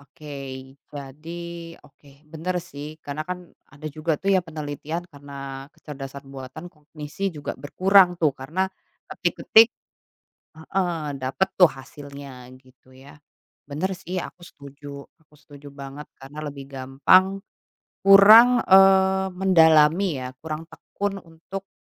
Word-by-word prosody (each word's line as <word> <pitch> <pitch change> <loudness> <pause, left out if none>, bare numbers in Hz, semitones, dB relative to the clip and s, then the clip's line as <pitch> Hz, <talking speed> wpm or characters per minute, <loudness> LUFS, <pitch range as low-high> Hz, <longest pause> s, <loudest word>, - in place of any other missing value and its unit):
Oke, 145 +1 -12 0.6
jadi, 150 +4 -9 0.5
oke, 145 0 -21 0.2
bener 180 +3 -3
sih, 155 -3 -9
karena 145 +1 -4
kan 180 - -3 0.3
ada 145 +2 -10
juga 155 0 -1
tuh 195 0 +1
ya, 185 - +4
penelitian 155 +1 -6
karena 140 -2 -9
kecerdasan 140 -1 -10
buatan, 135 +5 -9
kognisi 150 +5 -6
juga 150 -4 -6
berkurang 185 +4 +3
tuh 155 -4 +2
karena 160 +9 -2 0.4
ketik-ketik 225 +1 +4 0.9
heeh, 165 -2 -2
dapet 135 +9 0
tuh 180 - +8
hasilnya, 140 -1 -11
gitu 130 0 -23
ya. 140 +3 -16 0.5
Bener 180 +7 -2
sih 185 0 -6
aku 180 0 -7
setuju 140 -3 -11 0.2
aku 150 -1 -26
setuju 145 0 -15
banget 140 +1 -10
karena 135 +3 -11
lebih 140 -1 -10
gampang 145 +9 +3 0.6
kurang, 220 +5 +8
eee, 190 0 +5
mendalami 160 -4 +4
ya, 125 - -6
kurang 155 0 -6
tekun 200 -1 -5
untuk 175 +4 -10
155 Hz, 120 wpm, -23 LUFS, 140-185 Hz, 0.9 s, tuh